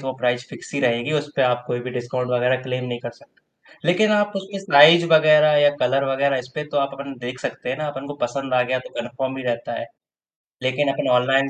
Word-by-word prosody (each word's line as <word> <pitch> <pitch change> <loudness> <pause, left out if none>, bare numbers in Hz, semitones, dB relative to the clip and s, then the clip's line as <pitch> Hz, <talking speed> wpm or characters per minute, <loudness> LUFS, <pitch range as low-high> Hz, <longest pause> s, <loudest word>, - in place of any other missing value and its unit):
तो 135 - -9
वो 130 - -2
price 125 -1 0
fix - - -12
ही 140 - -1
रहेगी, 120 +3 0
उसपे 145 -2 -1
आप 125 -1 +1
कोई 120 0 -3
भी 125 +1 -6
डिस्काउंट 125 0 -4
वगैरह 125 +1 +1
क्लेम 125 -1 -4
नहीं 120 -1 -4
कर 120 - -6
सकते। 115 - -24 0.4
लेकिन 215 +5 +3
आप 205 0 +1
उसमें 195 +1 -6
साइज़ 165 -1 +7
वगैरह 155 -1 +6
या 145 0 +5
कलर 135 +2 +1
वगैरह 135 +1 +1
इसमें 130 +4 -7
तो 150 - -5
आप 140 0 0
अपन 140 0 -8
देख 125 +1 -7
सकते - - -5
हैं 130 - -2
ना, 155 - -3
अपन 140 -1 -7
को 145 - -7
पसंद 130 +1 -3
आ 125 - +4
गया 130 +1 -1
तो 130 - -12
कन्फर्म 130 +2 -5
ही 130 - -6
रहता 120 -1 -3
है। - - -6 0.8
लेकिन 130 +3 0
अपन - - -3
ऑनलाइन 135 +2 +2
135 Hz, 235 wpm, -21 LUFS, 125-145 Hz, 0.8 s, साइज़